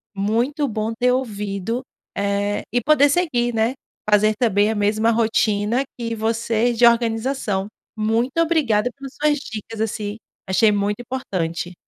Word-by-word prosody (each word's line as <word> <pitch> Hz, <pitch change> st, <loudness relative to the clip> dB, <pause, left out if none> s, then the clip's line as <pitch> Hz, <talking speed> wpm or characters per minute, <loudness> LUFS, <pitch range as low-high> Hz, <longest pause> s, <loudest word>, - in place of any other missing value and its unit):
muito 235 Hz, +9 st, 0 dB
bom 220 Hz, -1 st, -2 dB
ter 250 Hz, 0 st, +3 dB
ouvido, 210 Hz, -2 st, -2 dB, 0.3 s
eh, 200 Hz, 0 st, -1 dB
e 245 Hz, -, +1 dB
poder 290 Hz, +2 st, +4 dB
seguir, 255 Hz, -8 st, +1 dB
né. 225 Hz, +3 st, +1 dB, 0.4 s
Fazer 210 Hz, +1 st, +4 dB
também 210 Hz, -3 st, +2 dB
a 220 Hz, -, -1 dB
mesma 215 Hz, +2 st, +2 dB
rotina 220 Hz, +1 st, +1 dB
que 230 Hz, -1 st, -3 dB
vocês 230 Hz, +1 st, 0 dB
de 240 Hz, -, +6 dB
organização. 230 Hz, -3 st, +1 dB, 0.3 s
Muito 230 Hz, +6 st, 0 dB
obrigada 285 Hz, -10 st, +2 dB
pelas 275 Hz, -1 st, -9 dB
suas 300 Hz, 0 st, +2 dB
dicas, 220 Hz, -3 st, -8 dB
assim. 210 Hz, -1 st, -3 dB, 0.3 s
Achei 210 Hz, +3 st, +4 dB
muito 205 Hz, +2 st, -1 dB
importante. 180 Hz, -9 st, -3 dB
225 Hz, 135 wpm, -21 LUFS, 210-245 Hz, 0.4 s, de